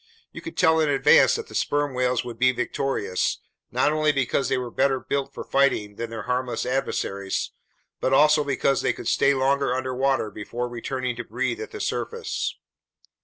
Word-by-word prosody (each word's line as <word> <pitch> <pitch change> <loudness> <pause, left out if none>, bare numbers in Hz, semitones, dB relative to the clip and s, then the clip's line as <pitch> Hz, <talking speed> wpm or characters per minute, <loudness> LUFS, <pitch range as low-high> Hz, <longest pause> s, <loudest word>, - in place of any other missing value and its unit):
You - - -9
could 330 - -9
tell 160 -3 +4
in 155 -2 +2
advance 140 -1 +5
that - - -5
the - - -13
sperm 145 -1 0
whales 125 -1 0
would 120 -2 -8
be 125 0 +5
victorious, 125 -7 -1 0.3
not 150 - +2
only 155 0 +3
because 135 -1 0
they 135 - +1
were 125 -2 -4
better 135 +1 +1
built 140 +1 -2
for - - -7
fighting 130 -7 +1
than 115 -1 -4
their 115 -1 -6
harmless 125 -1 -2
adversaries, 100 -7 -2 0.5
but 130 - 0
also 150 +2 +5
because 140 -1 +1
they - - +1
could - - -8
stay 140 0 +3
longer 135 -1 +1
underwater 130 -2 0
before 115 +4 -4
returning 125 +1 -3
to 120 - -4
breathe 120 +2 -2
at - - -6
the 425 - -8
surface. 460 +2 -3
130 Hz, 180 wpm, -24 LUFS, 120-140 Hz, 0.5 s, advance